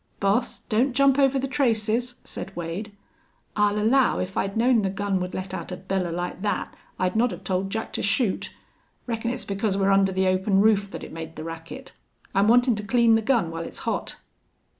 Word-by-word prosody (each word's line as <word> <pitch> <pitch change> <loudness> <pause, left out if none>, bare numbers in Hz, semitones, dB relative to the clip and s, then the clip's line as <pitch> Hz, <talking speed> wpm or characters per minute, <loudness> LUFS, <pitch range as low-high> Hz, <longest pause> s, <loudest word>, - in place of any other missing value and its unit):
"Boss, 200 +5 0
don't 245 +4 +1
jump 275 0 +4
over 275 -1 +4
the 270 +1 -1
traces," 245 -2 0
said 195 - -7
Wade. 175 +5 -5 0.6
"I'll 210 0 +2
allow 240 +5 +3
if 185 +1 -3
I'd 195 +2 -1
known 235 0 +4
the 195 - 0
gun 195 0 -1
would 180 0 -4
let 185 0 -5
out - - -5
a 180 - -4
bellar 185 -1 -2
like 175 +2 -4
that 205 0 -2 0.2
I'd 185 +2 0
not 240 +3 +3
have - - -8
told 190 +1 -1
Jack 220 +2 -4
to - - -2
shoot. 200 +1 0 0.5
Reckon 230 -1 -2
it's 250 +1 -3
because 200 0 -1
we're 195 0 +2
under 195 0 +4
the 190 0 +1
open 190 +1 +2
roof 205 -1 +3
that - - -7
it - - -9
made 160 0 -7
the 155 - -6
racket. 165 0 -8 0.4
I'm 200 +2 +3
wantin' 245 +2 +5
to 210 - -4
clean 230 +2 +4
the 225 - +4
gun 220 -8 +1
while 165 0 -4
it's - - -8
hot." - - -2
205 Hz, 205 wpm, -25 LUFS, 190-235 Hz, 0.6 s, wantin